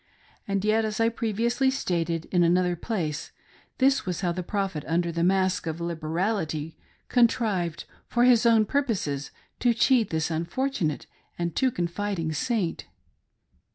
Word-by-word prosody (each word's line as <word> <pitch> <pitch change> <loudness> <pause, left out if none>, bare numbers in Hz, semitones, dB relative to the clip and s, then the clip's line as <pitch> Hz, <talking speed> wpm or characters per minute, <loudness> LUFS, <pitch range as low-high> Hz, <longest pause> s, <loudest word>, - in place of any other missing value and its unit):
And 200 0 -1
yet, 220 +1 +3
as 215 0 -3
I 225 0 +4
previously 235 +3 0
stated 170 -10 -1
in 180 - +3
another 180 +1 +3
place, 165 -6 -3 0.5
this 270 +1 +3
was 180 -3 -3
how 180 -2 +1
the 180 +1 -3
Prophet, 190 -4 -2
under 170 +1 0
the 170 0 -1
mask 185 -1 +2
of 160 +1 -3
liberality, 165 -1 -2 0.3
contrived, 215 -9 +1 0.2
for 240 - +2
his 245 -2 +5
own 225 -2 +5
purposes, 205 - -1 0.3
to 240 -2 +3
cheat 240 -1 +3
this 160 0 -1
unfortunate 170 - -1 0.3
and 170 -2 -2
too 260 - +3
confiding 175 -3 -2
Saint. 225 -4 -1
185 Hz, 140 wpm, -26 LUFS, 165-230 Hz, 0.5 s, his